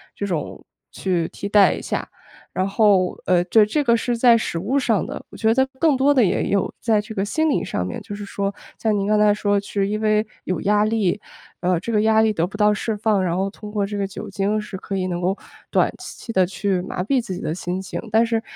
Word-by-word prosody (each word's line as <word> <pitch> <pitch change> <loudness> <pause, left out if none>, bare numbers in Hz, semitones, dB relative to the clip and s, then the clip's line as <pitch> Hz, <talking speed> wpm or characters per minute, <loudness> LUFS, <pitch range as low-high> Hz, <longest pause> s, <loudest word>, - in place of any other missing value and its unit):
这 200 - -3
种， 170 -6 -4 0.3
去 175 -4 -1
替 200 - -5
代 205 -1 +5
一 - - -8
下。 - - -3 0.4
然 185 +1 0
后， 195 -3 +3
呃， 175 -1 +3
这 210 +4 +5
这 295 +8 0
个 235 -4 +4
是 235 +1 -1
在 235 -1 +6
食 195 - -3
物 225 +11 0
上 230 -6 +1
的， - - -7
我 - - -12
觉 220 0 +3
得 265 +2 +3
更 310 -2 +4
多 275 +2 +4
的 260 -4 +4
也 185 - +1
有 200 -1 0
在 220 -2 +2
这 215 +1 -9
个 195 - 0
心 315 +9 +1
理 - - +1
上 90 - -2
面， 90 - -5
就 - - -8
是 205 0 -7
说 200 0 -3 0.2
像 215 -2 +1
您 200 0 -1
刚 215 0 +3
才 210 -1 +5
说 205 -1 +1
是 200 0 -2
因 215 +1 -2
为 215 0 +2 0.2
有 185 - -1
压 210 +1 +3
力， 215 -3 +1 0.4
呃， 180 -1 +1
这 230 - -5
个 210 - +3
压 220 0 +4
力 220 -1 +2
得 170 -4 +1
不 200 - -9
到 210 0 +4
释 215 +1 -2
放， 210 -2 +1
然 170 -2 0
后 195 +1 0
通 210 +1 -10
过 205 -2 0
这 205 +1 -5
个 200 - 0
酒 195 - -8
精 205 +2 0
是 210 -2 -7
可 195 +1 -4
以 185 -1 -1
能 175 -1 -3
够 185 +3 0 0.3
短 - - +2
期 230 - -8
地 185 -2 +4
去 190 0 -1
麻 180 - -4
痹 255 +6 +1
自 225 -5 -6
己 180 - -6
的 155 - -2
心 180 +1 -3
情。 190 - -5
但 225 +2 +4
是 225 -1 0
205 Hz, 270 characters per minute, -22 LUFS, 190-220 Hz, 0.4 s, 在